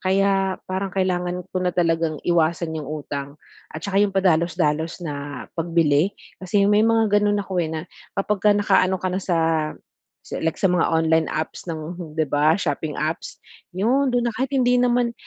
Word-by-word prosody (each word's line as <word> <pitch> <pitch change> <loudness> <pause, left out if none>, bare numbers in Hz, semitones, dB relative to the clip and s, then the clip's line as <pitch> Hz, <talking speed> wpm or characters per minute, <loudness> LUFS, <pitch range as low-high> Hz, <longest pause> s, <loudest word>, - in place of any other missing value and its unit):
Kaya 195 0 +1
parang 190 +1 -3
kailangan 180 -1 -1
ko 185 - -1
na 180 -1 -1
talagang 165 -2 +1
iwasan 170 -1 +1
yung 155 -3 -5
utang 145 -1 -5 0.3
at 155 - -8
'tsaka 200 0 +1
yung 200 -1 +1
padalos-dalos 170 -2 +1
na 145 -3 -5
pagbili 165 +1 +1 0.2
kasi 200 +2 +1
may 205 +1 +4
mga 220 -2 +3
ganon 205 0 +2
ako, 190 -3 -1
eh, 160 - -1
na 160 0 -3 0.4
kapagka 205 +1 +2
nakaano 190 -2 +3
ka 185 0 -3
na 185 - -1
sa 180 -3 0 0.9
sa - - -6
like 160 -1 -1
sa 190 -2 +2
mga 175 -2 +2
online 160 0 +2
apps 155 +3 -4
ng 165 0 -6
di 155 - +2
ba, 150 +3 +3
shopping 155 -4 -2
apps 155 +3 -3 0.4
yon 255 +8 +2
do'n 245 -1 +1
na. 235 - 0
Kahit 255 +5 -2
hindi 250 -1 +3
naman, 245 -1 +2
180 Hz, 175 wpm, -22 LUFS, 160-200 Hz, 0.9 s, may